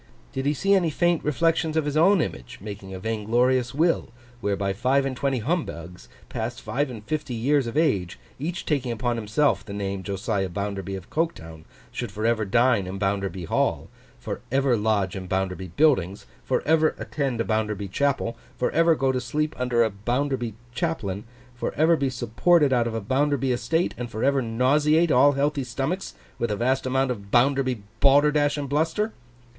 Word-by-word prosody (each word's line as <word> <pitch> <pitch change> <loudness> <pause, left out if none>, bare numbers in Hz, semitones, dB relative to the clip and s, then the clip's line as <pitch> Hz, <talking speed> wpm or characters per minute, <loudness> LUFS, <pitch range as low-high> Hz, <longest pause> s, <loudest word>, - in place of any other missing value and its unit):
Did 135 +1 -2
he 150 - +2
see 195 +7 +2
any 180 -4 +3
faint 175 +2 +1
reflection 160 +1 +1
of 155 - +1
his 145 0 -2
own 180 +4 +5
image 120 -4 -5
making 100 -1 -8
a 95 - -6
vain 110 +1 -3
glorious 125 +2 +2
will, 165 +3 +1 0.3
whereby 100 -2 -1
five 130 +6 +2
and 135 -1 -2
twenty 135 0 0
Humbugs, 105 - -4 0.2
past 115 +2 -4
five 130 +7 -2
and 115 -4 -8
fifty 150 -4 -3
years 135 +3 +1
of 115 - -4
age, 100 - +1 0.2
each 170 +5 -4
taking 135 -5 0
upon 120 +1 -1
himself 110 0 +1
the 100 - -8
name, 100 -1 -3
Josiah 100 +1 -2
Bounderby 100 +1 -4
of 95 0 -10
Coketown, 80 - -3 0.3
should 120 -4 -4
for 105 +2 -4
ever 115 -2 +2
dine 115 -1 +3
in 95 +1 -5
Bounderby 95 -2 -2
Hall, - - 0 0.3
for - - -6
ever 135 -1 +3
lodge 105 -4 0
in 95 -1 -6
Bounderby 95 0 -2
buildings, 100 - +1 0.2
for 130 - 0
ever 155 0 +3
attend 135 -5 -2
a - - +2
Bounderby 105 -2 -1
chapel, 135 +1 0 0.2
for 125 - 0
ever 165 0 +4
go 135 -2 +1
to 130 -1 -1
sleep 150 +5 -1
under 125 -2 +2
a 110 - 0
Bounderby 120 +2 -2 0.2
chaplain, 115 - -2 0.3
for 120 - -4
ever 160 +3 +4
be 140 -3 0
supported 130 +5 +2
out 120 -2 +2
of 115 - -3
a 115 - -2
Bounderby 135 +3 +1
estate, 125 +8 0
and 120 -1 -4
for 110 - -4
ever 140 0 +3
nauseate 145 +8 +2
all 140 +3 +6
healthy 140 0 0
stomachs, 135 +9 -3 0.2
with 120 - 0
a 105 - 0
vast 130 +4 0
amount 130 0 +1
of 100 -4 -6
Bounderby 130 -1 +2 0.2
balderdash 145 +1 +4
and 145 -1 -3
bluster? 160 +10 0
125 Hz, 185 wpm, -25 LUFS, 105-145 Hz, 0.3 s, all